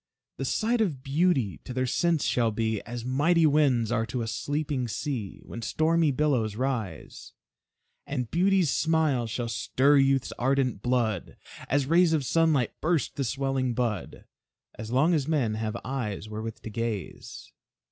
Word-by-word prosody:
The - - -3
sight 230 +1 +1
of 150 -11 -1
beauty 140 - +1
to 125 - -7
their 130 0 +1
sense 165 +4 +1
shall 120 -2 +2
be 110 -1 -1
As 120 -1 -6
mighty 155 +6 +3
winds 140 -7 +3
are 115 -2 0
to 120 -2 -3
a - - -4
sleeping 145 +1 -2
sea 115 -4 -4
When 115 - -8
stormy 160 +5 +2
billows 130 -7 0
rise. 115 - -4 0.7
And 125 -5 -3
beauty's 185 -3 +3
smile 155 -7 +1
shall 120 +2 -3
stir 130 +5 +2
youth's 135 -1 +2
ardent 130 -4 +1
blood 115 -6 -1 0.3
As 140 0 +2
rays 165 +3 +4
of 150 -4 +1
sunlight 155 -5 +2
burst 160 -1 0
the 140 - -1
swelling 135 -1 -1
bud; 110 -7 -3 0.5
As 110 0 -8
long 135 +8 +3
as 150 -4 0
men 140 -9 +1
have 110 +1 -3
eyes 120 -6 -3
wherewith 110 +1 -6
to 110 - -6
gaze. 115 -3 -5
130 Hz, 155 wpm, -27 LUFS, 115-150 Hz, 0.7 s, rays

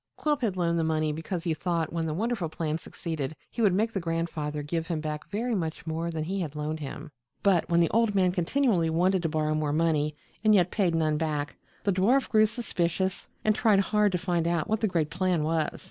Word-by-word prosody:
Quilp 295 -2 0
had 205 -6 0
loaned 170 -1 +1
the - - +1
money 155 -1 +1
because 165 +2 -4
he 170 -3 0
thought 165 -1 -2
when 165 -1 -1
the 155 - -1
wonderful 215 -3 -1
plan 155 -1 -2
succeeded 160 -4 -5 0.2
he 235 - -3
would 205 -4 +5
make 220 +3 +1
the 195 - 0
grandfather 165 -3 -2
give 165 +2 -2
him 165 -2 -1
back 150 -1 -5
very 230 +4 -1
much 165 -4 -3
more 165 +1 -2
than 160 -2 -3
he 190 +5 -2
had 155 -4 -4
loaned 150 +1 -3
him. 150 +1 -7 0.3
But 190 -4 +3
when 170 0 +4
the 170 - +3
old 225 -2 +2
man 185 -2 +4
continually 180 -1 +1
wanted 180 +3 +2
to 165 - -1
borrow 155 -1 0
more 155 -1 0
money 155 -2 +1 0.3
and 215 -1 +6
yet 180 -2 +3
paid 185 -6 +1
none 155 -2 +1
back, 150 -2 -2 0.3
the 200 - +2
dwarf 230 +9 +3
grew 215 -1 +5
suspicious 190 -4 -2 0.2
and 215 - +5
tried 210 -2 +3
hard 210 +1 +2
to - - +2
find 175 -2 0
out 170 -2 0
what 220 0 0
the 220 - +2
great 165 -5 0
plan 180 -3 +1
was. 160 0 0
170 Hz, 225 wpm, -28 LUFS, 155-195 Hz, 0.3 s, and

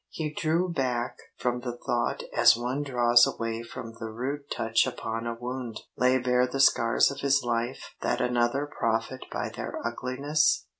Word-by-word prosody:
He 155 -2 -4
drew 165 +4 +1
back 125 -5 -1 0.2
from 125 0 -1
the 120 -1 -5
thought - - -1
as - - +6
one 125 +4 -2
draws 120 -3 +5
away 115 0 -3
from 115 -1 -8
the 110 - -5
rude 140 +6 -4
touch 115 0 +1
upon 115 +1 -4
a 115 - -2
wound. 125 -1 -5
Lay 125 +1 +3
bare 125 0 +2
the 135 +2 -4
scars 115 -2 +4
of 140 - -7
his 140 -1 +2
life 120 +1 -2
that - - 0
another 125 +3 +1
profit 115 -1 -2
by - - -2
their - - -6
ugliness? 140 +6 +1
125 Hz, 165 wpm, -27 LUFS, 115-135 Hz, 0.2 s, as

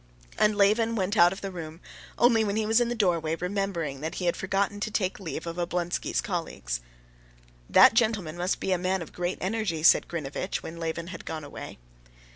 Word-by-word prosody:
And 210 0 +4
Levin 215 +3 +3
went 200 0 0
out 175 -3 +6
of 195 - -7
the 195 - -4
room, 165 -2 -8 0.4
only 235 -2 +4
when 205 -1 -1
he 220 0 0
was 225 +2 +3
in 240 - +1
the 240 - -2
doorway 170 -7 +1
remembering 180 -6 -3
that 160 +4 -4
he 180 - -3
had 175 - +2
forgotten 195 +1 -1
to 215 - -2
take 195 -3 -1
leave 175 -3 -5
of 170 0 -5
Oblonsky's 175 0 -1
colleagues. 165 - -3 0.9
"That - - +8
gentleman 220 -8 +1
must 180 +2 -1
be 190 - -2
a 185 - +2
man 185 0 0
of - - -14
great 175 +1 -2
energy," 190 -5 -1
said - - +6
Grinevitch, 165 +3 -4
when 165 - -7
Levin 165 +1 -4
had 170 -2 -8
gone 160 -1 -5
away. 145 - -9
185 Hz, 200 wpm, -27 LUFS, 165-205 Hz, 0.9 s, That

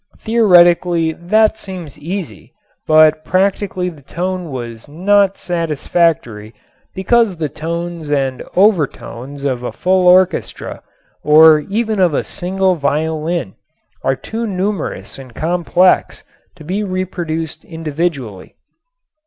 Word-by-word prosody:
Theoretically 175 -6 +3
that 215 +7 +1
seems 175 -7 -8
easy, 165 - -7 0.3
but 155 0 +5
practically 185 +1 0
the 160 -5 -13
tone 180 +4 -4
was 120 -3 -7
not 195 +5 +2
satisfactory 155 - -1 0.4
because 205 0 +2
the 155 -2 -2
tones 170 0 -5
and 135 -3 -1
overtones 145 - 0
of 130 -3 -1
a 125 - -4
full 185 0 +1
orchestra 185 -1 +2 0.4
or 155 +1 +7
even 215 +5 -2
of 175 -5 +3
a - - 0
single 190 +1 -1
violin 155 - -2 0.5
are 135 - +1
too 225 - -5
numerous 195 -6 -4
and 130 -3 -12
complex 175 +2 +1 0.3
to 165 - -13
be 190 +7 -2
reproduced 175 -4 -4
individually. 155 - -4
170 Hz, 110 wpm, -16 LUFS, 150-185 Hz, 0.5 s, or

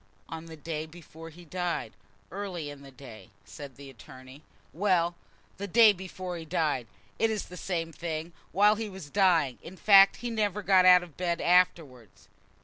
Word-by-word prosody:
"On 165 0 -8
the 160 -1 -11
day 155 0 -5
before 165 0 -13
he 170 +2 -15
died, 175 -8 -3 0.4
early 180 -6 -5
in 145 -1 -12
the 140 - -13
day," 130 -5 -13 0.2
said 140 +4 -11
the 140 +2 -12
attorney. 130 +1 -14 0.3
"Well, 175 -1 +1 0.4
the 200 +1 -5
day 220 +2 +6
before 185 -1 -7
he 165 - -7
died; 150 -6 -1 0.3
it 225 - +2
is 215 -2 -3
the 180 - -12
same 165 -2 -4
thing, 165 0 -5 0.2
while 205 +4 +4
he 220 -1 -4
was 185 -7 -11
dying, 170 -10 +2
in 185 +3 -11
fact. 195 -1 +6
He 240 0 -6
never 210 -2 -1
got 190 -1 +4
out 180 -1 +7
of 170 -5 -14
bed 175 -1 -1
afterwards." 160 - 0
170 Hz, 175 wpm, -28 LUFS, 150-190 Hz, 0.4 s, out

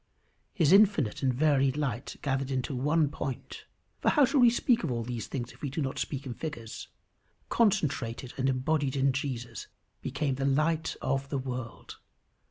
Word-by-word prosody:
His 165 -4 +3
infinite 195 - +4
and 130 -2 +2
varied 135 0 +2
light 130 -6 -2
gathered 135 -1 -1
into 130 0 -2
one 150 +4 +2
point 135 -3 -6 0.3
for - - +2
how 295 -4 +5
shall 275 +2 +1
we 245 -1 +8
speak 240 0 +2
at - - -1
all 120 -2 -1
of - - -5
these 120 -3 -4
things 125 -3 -4
if - - -19
we 145 - -2
do 140 - -4
not 135 -3 -2
speak 140 -1 -3
in 125 - -4
figures? 120 -7 -6 0.6
concentrated 130 - +1
and 135 0 +1
embodied 135 +1 0
in 135 0 +2
Jesus, 125 -5 -4 0.3
became 145 0 -1
the 135 +1 -3
light 155 +4 +1
of 135 +1 -1
the 140 - -1
world. 130 -2 -6
135 Hz, 180 wpm, -29 LUFS, 130-155 Hz, 0.6 s, we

